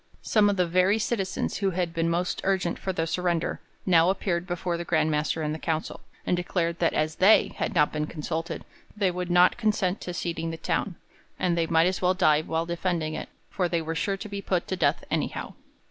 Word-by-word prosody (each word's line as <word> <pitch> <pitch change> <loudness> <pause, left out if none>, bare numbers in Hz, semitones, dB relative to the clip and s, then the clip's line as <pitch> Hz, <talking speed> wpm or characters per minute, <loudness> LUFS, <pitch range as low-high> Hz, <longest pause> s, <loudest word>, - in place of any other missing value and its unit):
Some 210 -2 +4
of 200 - 0
the 180 - +3
very 185 +4 +3
citizens 205 -4 -1
who 195 -2 +1
had 175 -2 -2
been 165 0 0
most 175 +2 -1
urgent 190 -3 0
for 190 - -2
the 165 -3 -1
surrender 170 0 -1 0.2
now 170 -2 +5
appeared 180 -2 -1
before 175 -1 -2
the 170 - -3
Grand 160 -2 +1
Master 150 +1 0
and 150 0 -1
the 160 - -5
council, 160 0 -2 0.3
and - - +2
declared 170 -1 -1
that 170 - +2
as 155 +1 0
they 200 +4 +6
had - - -2
not 150 -3 +3
been 150 0 -1
consulted 165 +1 -4 0.3
they 195 -3 +2
would 180 0 -4
not 180 +1 +5
consent 210 -4 0
to 180 - -5
ceding 165 -1 -3
the 165 - -5
town, 180 +2 -1 0.4
and 175 -2 +1
they 165 -1 +1
might 165 0 +4
as 185 0 0
well 185 0 +3
die 155 -5 +4
while 160 +1 -2
defending 170 -2 -2
it, - - -5 0.2
for 180 -3 0
they 170 0 +1
were 160 0 -3
sure 195 +4 -1
to 205 - -7
be 200 -1 -5
put 185 -3 -1
to 185 - 0
death - - +1
anyhow. - - -2
175 Hz, 220 wpm, -26 LUFS, 165-185 Hz, 0.4 s, they